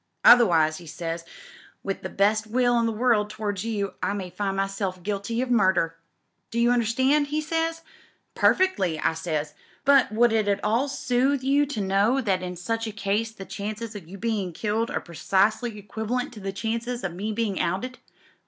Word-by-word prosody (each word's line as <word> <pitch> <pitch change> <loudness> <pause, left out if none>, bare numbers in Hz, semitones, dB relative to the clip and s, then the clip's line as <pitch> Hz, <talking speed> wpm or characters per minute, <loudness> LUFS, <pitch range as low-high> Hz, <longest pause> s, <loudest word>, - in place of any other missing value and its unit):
Otherwise,' 165 -10 +6
he 170 - -12
says, 165 +1 -5 0.6
*with 195 -1 -3
the - - -5
best 215 +2 +1
will 245 +1 +2
in 230 - +2
the - - 0
world 220 -2 +2
towards 210 -2 -3
you, 210 -3 -2
I - - 0
may 190 -3 -5
find 195 0 -2
myself 195 -2 -2
guilty 210 +4 -2
of 260 - -5
murderl 190 -8 +3 0.6
Do 235 - -2
you 240 +1 +4
understand?' 260 +5 +2
he 300 +2 -1
says. 325 +1 -1 0.5
'Perfectly,' 195 - +2
I 160 - +1
says, 155 -3 -3 0.3
'but 275 -5 +5
would 230 +1 +3
it 215 -2 +1
at 200 0 0
all 230 +6 +2
soothe 265 0 +1
you 285 +2 +3
to 250 -7 -3
know 200 +7 +2
that 195 -7 0
in 180 0 -5
such 225 +6 -2
a - - -4
case 210 +1 -1
the 195 -3 -10
chances 215 +3 -5
o' - - -4
your 185 +2 -11
being 210 -5 -2
killed 220 +5 -1
are - - -2
precisely 205 +7 0
equivalent 220 +5 -3
to 215 - -10
the 195 -1 -4
chances 230 +4 -3
o' 190 - -1
me 195 +5 -4
being 215 -3 -1
outed.' 240 +9 -2
215 Hz, 185 wpm, -25 LUFS, 195-240 Hz, 0.6 s, Otherwise